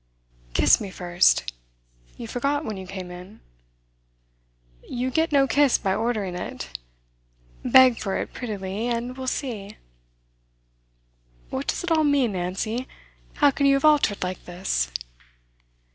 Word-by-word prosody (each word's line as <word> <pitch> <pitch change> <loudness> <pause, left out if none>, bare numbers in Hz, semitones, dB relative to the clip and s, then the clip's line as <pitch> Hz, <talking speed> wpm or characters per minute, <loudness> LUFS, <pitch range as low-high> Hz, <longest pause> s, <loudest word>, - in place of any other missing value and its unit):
'Kiss - - +5
me 200 - -5
first. 175 - +2 0.6
You 235 - -7
forgot 280 +6 -1
when 215 - -4
you 190 -1 -8
came 185 -1 -7
in.' 180 +4 -11 1.5
'You 250 +1 -2
get 320 +3 +1
no 280 -2 +5
kiss 285 -1 +3
by 190 -2 0
ordering 215 -4 -1
it. 60 - -6 0.9
Beg 255 -3 +6
for 195 -2 -2
it - - -4
prettily, 210 -2 -4
and 240 +1 -2
we'll 260 0 -6
see.' 215 -7 -4 1.7
'What 135 - -3
does - - -1
it 350 - -3
all 315 -1 +4
mean, 285 -6 +2
Nancy? 195 +7 -3 0.5
How 290 -1 +5
can 280 +1 +1
you 275 - +5
have 275 - +1
altered 290 -11 +3
like 185 0 -4
this? 175 - -2
225 Hz, 135 wpm, -24 LUFS, 185-270 Hz, 1.7 s, Beg